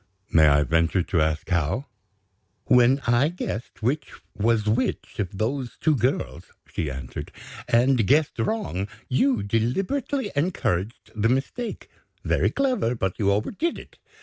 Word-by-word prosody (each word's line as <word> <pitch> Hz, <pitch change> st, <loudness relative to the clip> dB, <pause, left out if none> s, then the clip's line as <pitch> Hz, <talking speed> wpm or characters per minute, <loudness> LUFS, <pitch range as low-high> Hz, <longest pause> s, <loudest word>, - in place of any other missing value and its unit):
"May 80 Hz, -1 st, +6 dB
I 75 Hz, 0 st, +5 dB
venture 80 Hz, +3 st, +2 dB
to 85 Hz, -2 st, 0 dB
ask 80 Hz, 0 st, 0 dB
how?" 85 Hz, -, 0 dB, 0.8 s
"When 125 Hz, +2 st, +5 dB
I 120 Hz, +3 st, +3 dB
guessed 120 Hz, -10 st, -6 dB
which 135 Hz, +6 st, -1 dB, 0.2 s
was 110 Hz, 0 st, +1 dB
which 110 Hz, +2 st, -1 dB
of 95 Hz, -1 st, -3 dB
those 125 Hz, +4 st, -2 dB
two 155 Hz, -2 st, +3 dB
girls," 125 Hz, +2 st, -1 dB, 0.3 s
she 80 Hz, -, -2 dB
answered, 65 Hz, -2 st, -7 dB, 0.4 s
"and 120 Hz, -2 st, +3 dB
guessed 150 Hz, +3 st, +2 dB
wrong, 210 Hz, -, -1 dB, 0.2 s
you 130 Hz, -4 st, +2 dB
deliberately 195 Hz, -, -1 dB
encouraged 120 Hz, -, -1 dB
the 110 Hz, +1 st, +1 dB
mistake. 140 Hz, -, -2 dB, 0.4 s
Very -, -, +2 dB
clever, 255 Hz, -, 0 dB
but 95 Hz, -5 st, -2 dB
you 100 Hz, -2 st, +3 dB
overdid 190 Hz, -, -1 dB
it. -, -, -13 dB
115 Hz, 135 wpm, -25 LUFS, 95-140 Hz, 0.8 s, May